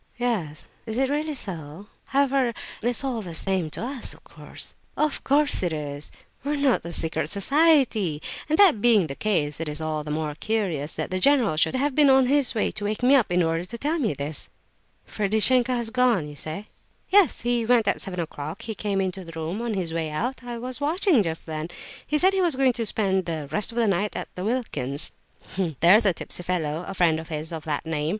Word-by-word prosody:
"Yes. 210 Hz, -12 st, -2 dB, 0.2 s
Is 220 Hz, +1 st, -3 dB
it 265 Hz, +1 st, +1 dB
really 300 Hz, +1 st, -1 dB
so? 170 Hz, -, -6 dB, 0.2 s
However, 270 Hz, -3 st, +1 dB, 0.3 s
it's 240 Hz, +3 st, +1 dB
all 255 Hz, -4 st, -2 dB
the 175 Hz, -5 st, -7 dB
same 185 Hz, -3 st, 0 dB
to 155 Hz, -, -4 dB
us, 260 Hz, -1 st, -5 dB
of -, -, -21 dB
course." -, -, -5 dB, 0.2 s
"Of 305 Hz, -1 st, 0 dB
course 290 Hz, +1 st, +2 dB
it 175 Hz, -2 st, 0 dB
is; 145 Hz, -1 st, -5 dB, 0.3 s
we 285 Hz, +2 st, -1 dB
are -, -, -1 dB
not 280 Hz, -3 st, +2 dB
a 170 Hz, -, -6 dB
secret 160 Hz, -2 st, -1 dB
society; 225 Hz, -, +3 dB, 0.3 s
and 310 Hz, -, +2 dB
that 355 Hz, -, +6 dB
being 220 Hz, -6 st, +5 dB
the 140 Hz, -, -5 dB
case, 155 Hz, -9 st, 0 dB
it 165 Hz, -2 st, -3 dB
is 150 Hz, +1 st, -3 dB
all 155 Hz, -1 st, -2 dB
the 150 Hz, -, -8 dB
more 150 Hz, 0 st, -2 dB
curious 165 Hz, -5 st, -2 dB
that -, -, -4 dB
the 185 Hz, -, -1 dB
general 250 Hz, -, +3 dB
should 160 Hz, -, +2 dB
have 280 Hz, +2 st, 0 dB
been 290 Hz, 0 st, +5 dB
on 265 Hz, -1 st, +6 dB
his 275 Hz, -1 st, +2 dB
way 215 Hz, -, +1 dB
to 205 Hz, -, -5 dB
wake 215 Hz, +3 st, -3 dB
me 255 Hz, +3 st, +5 dB
up 240 Hz, -9 st, +2 dB
in 180 Hz, 0 st, +3 dB
order 165 Hz, +1 st, 0 dB
to 220 Hz, +6 st, -7 dB
tell 305 Hz, +7 st, -1 dB
me 220 Hz, -, 0 dB
this." 145 Hz, +2 st, -5 dB, 0.6 s
"Ferdishenko 225 Hz, +5 st, +3 dB
has 235 Hz, -2 st, -1 dB
gone, 245 Hz, -10 st, +2 dB
you 145 Hz, -, -10 dB
say?" 155 Hz, +8 st, -6 dB, 0.4 s
"Yes, 390 Hz, -, +4 dB
he 240 Hz, 0 st, +1 dB
went 230 Hz, -2 st, +3 dB
at -, -, +1 dB
seven 180 Hz, -2 st, -4 dB
o'clock. 155 Hz, +1 st, -6 dB
He 220 Hz, -, -3 dB
came 200 Hz, -1 st, -1 dB
into 190 Hz, 0 st, -3 dB
the 165 Hz, -1 st, -9 dB
room 165 Hz, +7 st, -3 dB
on 235 Hz, -3 st, -2 dB
his 175 Hz, -4 st, -2 dB
way 165 Hz, -1 st, -2 dB
out; 245 Hz, +13 st, -3 dB
I 240 Hz, -1 st, -6 dB
was 250 Hz, +3 st, -6 dB
watching 320 Hz, -, +3 dB
just 165 Hz, -4 st, -3 dB
then. 155 Hz, 0 st, -4 dB, 0.4 s
He 300 Hz, -, +1 dB
said 375 Hz, +5 st, +5 dB
he 385 Hz, -, +1 dB
was 340 Hz, -6 st, +3 dB
going 260 Hz, -1 st, +3 dB
to 230 Hz, -2 st, -2 dB
spend 190 Hz, -4 st, +1 dB
'the 155 Hz, -4 st, -4 dB
rest 210 Hz, +1 st, -1 dB
of 230 Hz, -, -10 dB
the 235 Hz, -, +3 dB
night' 200 Hz, +1 st, 0 dB
at -, -, -5 dB
Wilkin's; 180 Hz, -, 0 dB, 0.7 s
there's 205 Hz, +6 st, +6 dB
a 190 Hz, -, +3 dB
tipsy 175 Hz, -, -3 dB
fellow, 170 Hz, -2 st, -2 dB
a 195 Hz, -, -6 dB
friend 165 Hz, -3 st, +3 dB
of 160 Hz, -, -8 dB
his, 155 Hz, 0 st, -4 dB
of 160 Hz, -1 st, -6 dB
that 155 Hz, +1 st, -2 dB
name. 155 Hz, -1 st, -1 dB
205 Hz, 220 wpm, -25 LUFS, 160-255 Hz, 0.7 s, that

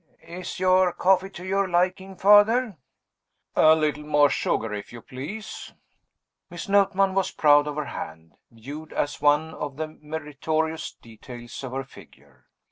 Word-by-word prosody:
"Is 175 Hz, +1 st, -7 dB
your 185 Hz, -1 st, +3 dB
coffee 190 Hz, +1 st, +2 dB
to 185 Hz, -2 st, -10 dB
your 195 Hz, 0 st, 0 dB
liking, 185 Hz, +2 st, 0 dB
Father?" 210 Hz, +3 st, +5 dB, 0.8 s
"A 155 Hz, 0 st, +6 dB
little 150 Hz, -1 st, -1 dB
more 145 Hz, -1 st, +3 dB
sugar, 110 Hz, -1 st, -1 dB
if 105 Hz, -1 st, -7 dB
you 120 Hz, -, -9 dB
please." 150 Hz, -, -8 dB, 0.8 s
Miss 175 Hz, -1 st, -7 dB
Notman 195 Hz, -1 st, +3 dB
was 195 Hz, -1 st, +1 dB
proud 145 Hz, -1 st, +4 dB
of 150 Hz, -, -4 dB
her 150 Hz, -1 st, -3 dB
hand, 80 Hz, -6 st, -8 dB, 0.2 s
viewed 140 Hz, +8 st, -10 dB
as 145 Hz, -1 st, -2 dB
one 150 Hz, +2 st, +2 dB
of 145 Hz, -3 st, -6 dB
the 155 Hz, 0 st, -3 dB
meritorious 155 Hz, +1 st, -3 dB
details 120 Hz, +2 st, -11 dB
of 130 Hz, -1 st, -6 dB
her 135 Hz, +1 st, -3 dB
figure. 135 Hz, -, -19 dB
155 Hz, 145 wpm, -25 LUFS, 145-185 Hz, 0.8 s, A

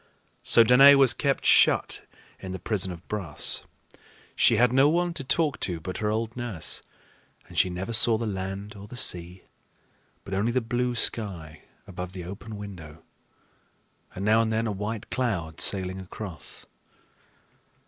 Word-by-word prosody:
So 115 Hz, -, +5 dB
Danaë 135 Hz, +5 st, +8 dB
was 135 Hz, -3 st, +5 dB
kept 140 Hz, +1 st, -1 dB
shut -, -, +4 dB
up -, -, -29 dB, 0.3 s
in 95 Hz, -1 st, -5 dB
the -, -, -4 dB
prison 95 Hz, 0 st, -1 dB
of 85 Hz, -1 st, -11 dB
brass. 95 Hz, -8 st, -3 dB, 0.7 s
She -, -, +4 dB
had 125 Hz, 0 st, +3 dB
no 135 Hz, +3 st, +5 dB
one 175 Hz, +2 st, 0 dB
to 140 Hz, -, -6 dB
talk 150 Hz, +1 st, 0 dB
to 85 Hz, -3 st, -2 dB
but 95 Hz, +3 st, -6 dB
her 105 Hz, -, -1 dB
old 110 Hz, +1 st, -2 dB
nurse; 120 Hz, -9 st, -3 dB, 0.7 s
and -, -, -14 dB
she 95 Hz, -, +3 dB
never 95 Hz, +6 st, -5 dB
saw 115 Hz, 0 st, +4 dB
the 115 Hz, -, -3 dB
land 100 Hz, +1 st, -5 dB
or 100 Hz, 0 st, -11 dB
the 120 Hz, -, -9 dB
sea, 90 Hz, -3 st, -1 dB, 0.8 s
but 100 Hz, -, -8 dB
only 105 Hz, +5 st, 0 dB
the 130 Hz, -, +1 dB
blue 120 Hz, +1 st, -2 dB
sky 90 Hz, -10 st, -2 dB, 0.2 s
above 90 Hz, -1 st, -7 dB
the 90 Hz, -2 st, -7 dB
open 100 Hz, +3 st, -8 dB
window 85 Hz, -6 st, -10 dB, 1.1 s
and 95 Hz, -, -4 dB
now 110 Hz, +2 st, +4 dB
and 110 Hz, -1 st, -1 dB
then 110 Hz, +1 st, 0 dB
a 110 Hz, -, -1 dB
white 105 Hz, +2 st, -5 dB
cloud 90 Hz, -11 st, -2 dB
sailing 95 Hz, -1 st, +2 dB
across. 95 Hz, -1 st, -9 dB
105 Hz, 165 wpm, -26 LUFS, 95-120 Hz, 1.1 s, Danaë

